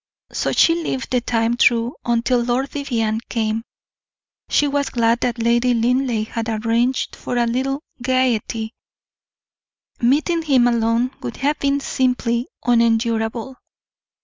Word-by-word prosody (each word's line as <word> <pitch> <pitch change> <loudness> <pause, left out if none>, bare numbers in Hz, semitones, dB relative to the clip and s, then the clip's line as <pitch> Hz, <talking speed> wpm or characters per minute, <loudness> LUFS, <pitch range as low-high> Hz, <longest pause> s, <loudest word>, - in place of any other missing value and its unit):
So - - -1
she 335 +1 +3
lived 265 -5 -4
the 250 -1 +2
time 230 0 0
through 235 0 +3
until 235 +1 +1
Lord 245 +3 0
Vivianne 225 -6 -1
came. 220 -1 -1 0.9
She 290 - +3
was 285 0 0
glad 235 0 +2
that 245 -1 -1
Lady 235 +1 +2
Linleigh 240 -1 +1
had 225 0 -4
arranged 230 +3 0
for 245 - -4
a 240 - +3
little 265 +4 -1 0.2
gayety; 235 -3 0 1.3
meeting 300 +7 +2
him 265 -6 +3
alone 235 +1 +1
would 120 - -6
have 290 +2 0
been 280 0 +1
simply 250 -2 0 0.2
unendurable. 230 +1 +1
240 Hz, 125 wpm, -20 LUFS, 230-260 Hz, 1.3 s, she